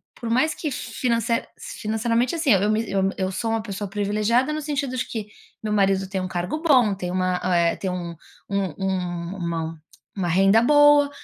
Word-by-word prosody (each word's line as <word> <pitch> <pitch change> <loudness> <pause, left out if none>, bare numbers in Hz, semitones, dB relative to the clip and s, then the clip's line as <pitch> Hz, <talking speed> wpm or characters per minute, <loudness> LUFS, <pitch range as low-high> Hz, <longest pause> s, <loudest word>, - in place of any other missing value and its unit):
por 230 - -6
mais 260 +7 +2
que 305 - -3
finance 235 -2 -1 0.3
financeiramente 235 - -1
assim, 310 -6 +1
eu 200 +2 +2
me 220 +1 0 0.3
eu 190 0 -1
sou 225 +4 -2
uma 225 -1 0
pessoa 200 -1 -5
privilegiada, 215 +6 +1
no 310 - -3
sentido 280 -3 -2
de - - -1
que 215 -3 -5 0.4
meu 215 - -2
marido 195 -1 +2
tem 190 -1 -2
um 185 - -3
cargo 180 - -3
bom, 255 -10 +4
tem 180 -2 -5
uma, 185 0 0
eh, 170 -2 +2
tem 190 - -3
um 175 -2 -4 0.4
um 200 -1 0
uma 170 -3 -3 0.4
uma 180 -2 -1
renda 195 +5 +5
boa, 290 +1 +6
210 Hz, 175 wpm, -23 LUFS, 185-245 Hz, 0.4 s, boa